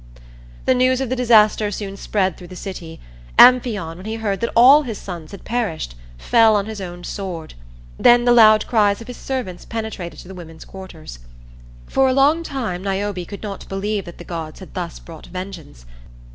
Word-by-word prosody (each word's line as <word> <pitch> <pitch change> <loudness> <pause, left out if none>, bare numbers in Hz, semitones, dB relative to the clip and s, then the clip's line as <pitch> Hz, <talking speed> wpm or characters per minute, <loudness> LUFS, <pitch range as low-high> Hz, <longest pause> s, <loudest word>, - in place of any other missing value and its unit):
The - - +4
news 255 0 +2
of 265 -3 -2
the 255 - 0
disaster 220 -4 +4
soon 200 -1 -5
spread 190 -3 -1
through 180 - -12
the 185 - -11
city. 175 -3 -8 0.4
Amphion, 220 -10 +5
when 185 +4 -10
he 220 - -3
heard 210 -3 -2
that 235 - -2
all 260 +6 +8
his 235 -7 -5
sons 170 -5 -8
had 200 - -12
perished, 215 - -3 0.2
fell 225 - +4
on 200 -1 0
his 215 -2 -7
own 175 -1 -8
sword. 175 -5 -6 0.5
Then 240 0 +5
the 245 - +4
loud 215 -3 +6
cries 205 -3 +2
of 230 - -10
his 250 - -8
servants 250 -10 -5
penetrated 220 -6 -6
to - - -15
the 190 - -9
women's 165 -3 -11
quarters. 175 - -11 0.7
For 270 0 +2
a - - +2
long 285 +5 +3
time 240 - -4
Niobe 195 -2 -3
could 200 - -9
not 200 -2 -7
believe 200 +1 -2
that 175 - -11
the - - -10
gods 165 -3 -7
had 190 - -12
thus 175 -3 -5
brought 165 -2 -12
vengeance. 180 - -9
200 Hz, 190 wpm, -20 LUFS, 180-235 Hz, 0.7 s, all